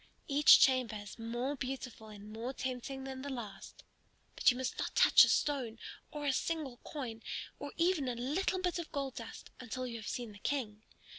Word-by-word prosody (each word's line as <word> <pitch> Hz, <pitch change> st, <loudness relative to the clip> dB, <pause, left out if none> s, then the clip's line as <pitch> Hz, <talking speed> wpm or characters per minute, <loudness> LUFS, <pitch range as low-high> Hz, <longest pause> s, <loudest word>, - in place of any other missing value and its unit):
Each 290 Hz, +1 st, +8 dB
chamber 255 Hz, -5 st, +4 dB
is 205 Hz, +2 st, -8 dB
more 240 Hz, +5 st, -2 dB
beautiful 255 Hz, -4 st, -5 dB
and 210 Hz, 0 st, -10 dB
more 235 Hz, +4 st, -4 dB
tempting 265 Hz, +1 st, -4 dB
than 265 Hz, -1 st, -6 dB
the 285 Hz, -, -5 dB
last. 235 Hz, -7 st, -7 dB, 0.5 s
But -, -, +5 dB
you 250 Hz, -, +2 dB
must 260 Hz, 0 st, -3 dB
not -, -, -3 dB
touch -, -, +8 dB
a -, -, +4 dB
stone 255 Hz, -6 st, +1 dB, 0.3 s
or 295 Hz, -1 st, -5 dB
a 280 Hz, -, +2 dB
single 295 Hz, -4 st, -2 dB
coin, 240 Hz, -7 st, -6 dB, 0.4 s
or 285 Hz, -, -6 dB
even 335 Hz, -5 st, +2 dB
a 245 Hz, -, -1 dB
little 295 Hz, +11 st, 0 dB
bit 360 Hz, -1 st, 0 dB
of 335 Hz, -, -6 dB
gold 275 Hz, -2 st, -2 dB
dust, -, -, -9 dB
until 255 Hz, +1 st, -4 dB
you 235 Hz, -2 st, -5 dB
have 215 Hz, -, -8 dB
seen 240 Hz, -3 st, -4 dB
the 205 Hz, -, -13 dB
King. 220 Hz, -5 st, -2 dB
255 Hz, 195 wpm, -34 LUFS, 230-285 Hz, 0.5 s, Each